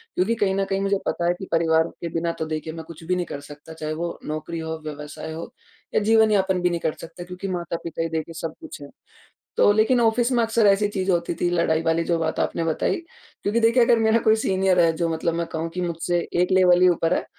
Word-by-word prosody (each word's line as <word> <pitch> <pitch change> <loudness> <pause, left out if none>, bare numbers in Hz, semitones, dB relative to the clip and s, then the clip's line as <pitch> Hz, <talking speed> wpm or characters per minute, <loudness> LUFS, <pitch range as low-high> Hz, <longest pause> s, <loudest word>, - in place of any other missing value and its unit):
क्योंकि 210 +6 +1
कहीं 200 -4 +1
न 195 0 0
कहीं 195 0 -1
मुझे 200 0 +1
पता 170 - -1
है 175 - +3
कि 190 - -7
परिवार 160 0 +3
के 170 - -3
बिना 170 0 0
तो, 160 - -4
देखिए, 155 0 -4
मैं 165 0 -7
कुछ 165 0 -12
भी 180 +3 0
नहीं 180 -1 -1
कर 145 - -6
सकता, 145 +2 -12
चाहे 155 -1 -4
वो 170 +2 -4
नौकरी 155 +2 -4
हो, 160 0 -4
व्यवसाय 150 +1 -7
हो, 165 +8 -7 0.4
या - - +5
जीवन 220 +1 +4
यापन 190 -3 +2
भी 180 - +2
नहीं 170 -1 -2
कर 155 - -1
सकता, 165 +1 -9
क्योंकि 180 +2 -7
माता-पिता 170 -3 -4
ही 165 - -1
देखिए 160 +1 -4
सब 165 - -4
कुछ - - -9
हैं। 140 - -9 0.7
तो - - +6
लेकिन 220 +4 +3
ऑफ़िस 235 +2 +2
में 240 -2 +3
अक्सर 225 -1 +3
ऐसी 200 +1 +4
चीज़ 190 -1 0
होती 170 -1 0
थी, 175 - +2
लड़ाई 170 -2 +1
वाली 165 0 +1
जो 170 0 0
बात 160 -1 -2
आपने 165 - -1
बताई। 160 -1 0 0.5
क्योंकि 210 +3 +1
देखिए, 235 +2 +4
अगर 235 0 +4
मेरा 220 +1 +3
कोई 220 -1 +4
सीनियर 190 -4 +1
है, 165 -1 +5
जो 165 +1 -1
मतलब 165 +1 -1
मैं 170 0 -1
कहूँ 165 +1 -3
कि 180 - -3
मुझसे 175 0 -1 0.2
एक 180 - +1
लेवल 180 -1 +5
ही 185 - +7
ऊपर 165 -1 +1
है, - - -1
175 Hz, 250 wpm, -23 LUFS, 165-195 Hz, 0.7 s, ही